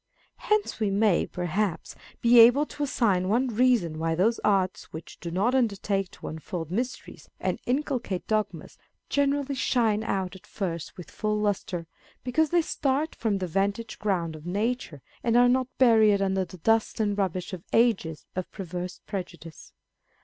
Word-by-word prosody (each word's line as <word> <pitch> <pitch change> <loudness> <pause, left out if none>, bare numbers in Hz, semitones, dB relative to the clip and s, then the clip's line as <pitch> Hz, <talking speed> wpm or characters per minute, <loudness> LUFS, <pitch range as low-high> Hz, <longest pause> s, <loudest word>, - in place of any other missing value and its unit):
Hence 425 - 0
we 215 -2 +1
may, 200 -2 +2
perhaps, 180 0 -2 0.3
be 235 0 +6
able 245 +6 +7
to 295 - -10
assign 205 -10 +1
one 240 +5 +2
reason 230 -9 +2
why 165 0 0
those 220 +7 +2
arts 190 -3 +1
which 160 - -9
dp 170 - -5
not 205 +8 +1
undertake 200 -6 0
to - - -10
unfold 165 +1 -6
mysteries 245 +6 -4
and - - -1
inculcate 250 -8 -1
dogmas, 215 -1 -2 0.3
generally 285 0 +1
shine 225 -5 +1
out 190 -4 -2
at 190 - -15
first 170 -5 -5
with 165 -6 -10
full 215 0 -1
lustre, 195 -4 -2 0.4
because 300 +5 +1
they 345 +1 +3
start 285 +2 -1
from 220 -3 -1
the 190 - -2
'vantage 200 +6 -2
ground 180 -6 -1
of 155 - -11
nature, 205 - -2 0.2
and 235 0 +3
are 245 0 +6
not 255 0 +2
buried 220 -5 +5
under 190 -1 0
the 185 - -12
dust 225 +7 +1
and 205 -2 +1
rubbish 185 -1 -2
of 180 -2 -6
ages 200 -9 +1
of 185 -1 -4
perverse 180 -1 -6
prejudice. 170 -5 -7
205 Hz, 160 wpm, -27 LUFS, 180-240 Hz, 0.4 s, able